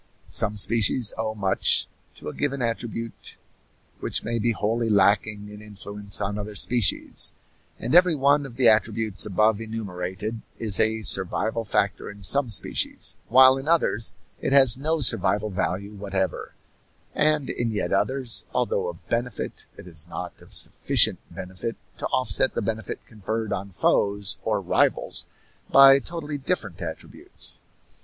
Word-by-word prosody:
Some 105 -2 +1
species 110 +1 +3
owe 110 0 -3
much 95 -2 +2 0.3
to - - -11
a 75 - -5
given 140 -1 -2
attribute 115 0 -5 0.6
which - - -2
may 115 +1 -2
be 115 +2 +1
wholly 115 +1 -1
lacking 105 +1 +1
in 105 0 -11
influence 100 -1 -4
on 100 +1 -3
other 105 0 -7
species; 115 -3 +2 0.4
and 120 - -4
every 175 -1 +5
one 140 0 +2
of 120 - -14
the 125 -1 +3
attributes 110 -1 +1
above 105 +2 +1
enumerated 105 0 -5 0.2
is 110 -3 +2
a 110 0 +1
survival 110 +4 -1
factor 100 -1 -1
in 100 0 -12
some 140 +6 +4
species, 105 - +2
while 130 +2 +6
in 135 - -9
others 155 -9 +1 0.3
it 140 - -1
has 135 -4 +6
no 155 +4 -2
survival 105 -4 +1
value 95 +2 -3
whatever, 95 -3 -4 0.6
and 155 -2 +1
in 120 -1 -2
yet 105 -2 -2
others, 125 +2 -1
although 120 -7 0
of 85 0 -11
benefit, 120 -1 -4
it - - -12
is 80 -3 -6
not 90 0 -7
of - - -18
sufficient - - +2
benefit 95 +4 -7 0.2
to - - -2
offset 125 0 +2
the - - -1
benefit 110 +1 -5
conferred 110 +1 -4
on 100 +1 -5
foes 100 +2 +1
or - - -1
rivals - - +1 0.4
by 135 0 +7
totally 150 -1 -6
different 105 - -3
attributes. 80 -2 -6
110 Hz, 145 wpm, -24 LUFS, 100-125 Hz, 0.6 s, by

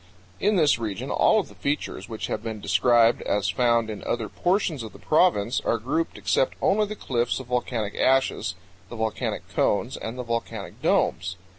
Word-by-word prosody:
In 210 +1 +2
this 150 -9 +4
region 105 -5 -4
all - - +4
of - - -3
the - - -15
features 140 -8 -3
which 110 -1 -4
have - - -3
been 110 -1 -5
described 115 +4 +3
as 100 -1 0
found 115 0 +2
in 110 -2 -6
other 115 -3 -2
portions 175 - 0
of 110 -2 -8
the - - -12
province 135 - +2
are 115 - +1
grouped 145 +8 -2
except 100 +6 +1
only 210 +1 +2
the 215 - -5
cliffs 120 - -1
of 130 - -8
volcanic 120 -3 -2
ashes, 130 -8 +1 0.3
the - - -7
volcanic 110 -1 -2
cones, 115 +6 0
and 115 +3 -6
the 125 - -3
volcanic 115 -1 -4
domes. 90 +2 +1
120 Hz, 180 wpm, -25 LUFS, 110-135 Hz, 0.3 s, this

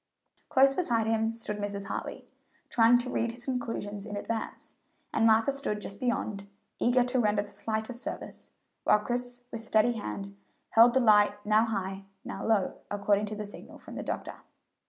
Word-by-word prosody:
Close 270 +1 +5
beside 240 -10 +1
him 225 0 +1
stood 225 -2 -4
Mrs. 200 -1 -4
Hartley, - - -5 0.5
trying 235 +1 +6
to 245 +1 -3
read 230 - 0
his 240 +1 -7
conclusions 230 -5 -3
in 205 -1 -5
advance, 225 +2 -4 0.4
and 225 - +4
Martha 225 +4 +4
stood 270 -6 -2
just 200 0 -7
beyond, 215 -5 -2 0.3
eager 245 +1 +4
to 250 +1 0
render 210 -2 +2
the 205 - -13
slightest 220 +3 -3
service, - - -7 0.3
while - - +5
Chris, 245 +3 -3
with 230 - -5
steady 225 +1 +3
hand, 105 - -5 0.4
held 235 +2 +7
the - - +6
light 210 -3 +5
now 215 +2 +4
high, 195 -3 -3 0.2
now - - -5
low, 215 -4 +1
according 205 0 +1
to 210 - -4
the 210 0 -5
signal 205 - -11
from - - -12
the - - -4
doctor. - - -4
220 Hz, 175 wpm, -29 LUFS, 205-240 Hz, 0.5 s, held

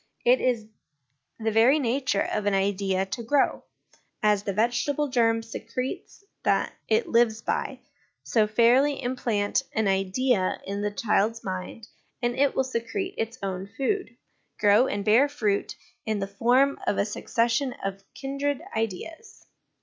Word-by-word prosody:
It 250 +2 +5
is 240 -4 0 0.7
the 220 0 0
very 230 +7 +5
nature 255 -5 0
of 210 -1 -1
an 200 - +2
idea 195 -1 0
to 200 +5 -5
grow: 270 +5 +1 0.6
as 210 -2 +3
the 200 - -3
vegetable 245 +8 0
germ 225 -2 +2
secretes 230 - -6 0.2
that - - +1
it 445 +1 +2
lives 230 -1 +2
by, - - -2 0.4
so, 220 -2 +2
fairly 245 +6 +4
implant 245 -4 0
an 220 -2 +1
idea 195 +2 +1
in 200 +1 -3
the 205 - 0
child's 215 +2 0
mind, 185 +3 -6 0.3
and 240 0 -1
it 280 0 +2
will 265 - +2
secrete 260 - -3
its 225 +1 -3
own 190 0 -4
food, 380 +8 -1 0.4
grow, 210 +5 +5
and 200 -1 -3
bear 240 +7 +5
fruit 210 -8 -1 0.3
in 220 -1 -1
the 195 - -2
form 245 +8 +2
of - - +1
a - - +2
succession 235 +4 0
of 195 0 -4
kindred 275 0 -2 0.2
ideas. 270 - -5
230 Hz, 145 wpm, -26 LUFS, 205-260 Hz, 0.7 s, It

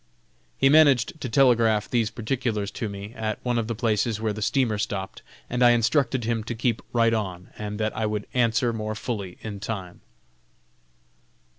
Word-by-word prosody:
He 135 - +4
managed 145 -1 +4
to 130 - -3
telegraph 115 -4 +3
these 115 -3 +1
particulars 115 -2 -2
to 110 - -4
me, 100 +2 -8
at 110 -2 -3
one 120 -1 +1
of 110 - -2
the 115 - -2
places 110 -1 0
where 110 -1 -1
the 110 - -7
steamer 110 -1 +1
stopped, 95 -2 -4 0.3
and 125 0 -2
I 120 -1 +7
instructed 120 +1 +1
him 115 -1 -1
to 120 - -4
keep 115 0 0
right 115 -1 +3
on, 95 -5 -3
and 105 0 -5
that 110 0 -1
I 110 0 0
would 105 -1 -3
answer 120 -1 +2
more 110 -1 -3
fully 105 -5 -5
in 105 -2 -6
time. 95 -4 -6
110 Hz, 175 wpm, -25 LUFS, 105-120 Hz, 0.3 s, I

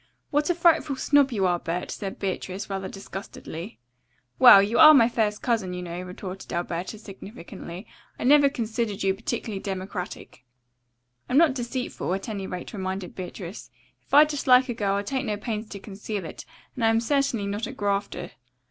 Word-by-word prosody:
"What 295 +2 +1
a 350 - +2
frightful 330 -4 +3
snob 280 0 +3
you 200 -5 0
are, 175 -1 +2
Bert," 170 +2 -4
said 195 -2 -5
Beatrice 195 0 -4
rather 190 -1 -3
disgustedly. 195 -1 -8 0.6
"Well, 195 - +10
you 210 +4 0
are 310 -1 +10
my 230 -4 +6
first 215 -3 -1
cousin, 220 -7 0
you 180 - -5
know," 175 0 -5
retorted 185 +1 -8
Alberta 175 +4 -3
significantly. 195 -2 -10 0.3
"I - - -5
never 285 +2 +6
considered 225 -4 -3
you 195 0 +3
particularly 220 -1 -4
democratic." 190 -7 -6 0.9
"I'm 250 - +2
not 320 -3 +5
deceitful, 250 -5 -4
at 195 - -6
any 200 -4 -4
rate," 180 +4 -7
reminded 190 -2 -4
Beatrice. 185 +1 -8 0.3
"If - - -34
I 290 +2 +9
dislike 265 -3 +3
a - - 0
girl 200 -3 0
I 200 - -1
take 265 +5 -2
no 210 -1 -1
pains 215 0 -4
to 200 - -7
conceal 200 -1 -6
it, - - -9 0.3
and 245 - -4
I - - +5
am 225 0 +3
certainly 245 -3 0
not 205 +2 -3
a - - -6
grafter." 200 0 -2
205 Hz, 175 wpm, -25 LUFS, 190-245 Hz, 0.9 s, Well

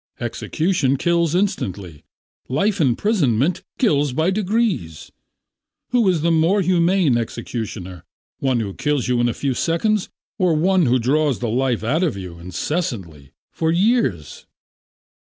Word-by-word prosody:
Execution 140 +4 0
kills 170 +1 +1
instantly, 100 - -2 0.5
life 190 +9 +1
imprisonment 145 - +1 0.2
kills 145 - +2
by 160 +7 +1
degrees. 195 - -1 0.8
Who 240 -5 +3
is 175 -4 +1
the 170 +2 +2
more 165 +5 +3
humane 175 -6 +2
executioner, 110 -6 -6 0.4
one 130 -3 +1
who 100 -3 -4
kills 145 +1 -1
you 125 -1 +1
in 120 - +2
a - - -3
few 140 -2 -1
seconds 180 - 0 0.3
or 180 -4 +3
one 180 0 +3
who 125 +2 +3
draws 140 +3 +1
the 120 - -3
life 125 -1 0
out 145 +9 +1
of 165 - 0
you 90 -3 -8
incessantly, 90 - -4 0.2
for 160 0 0
years?" 175 - 0
150 Hz, 135 wpm, -21 LUFS, 115-180 Hz, 0.8 s, Who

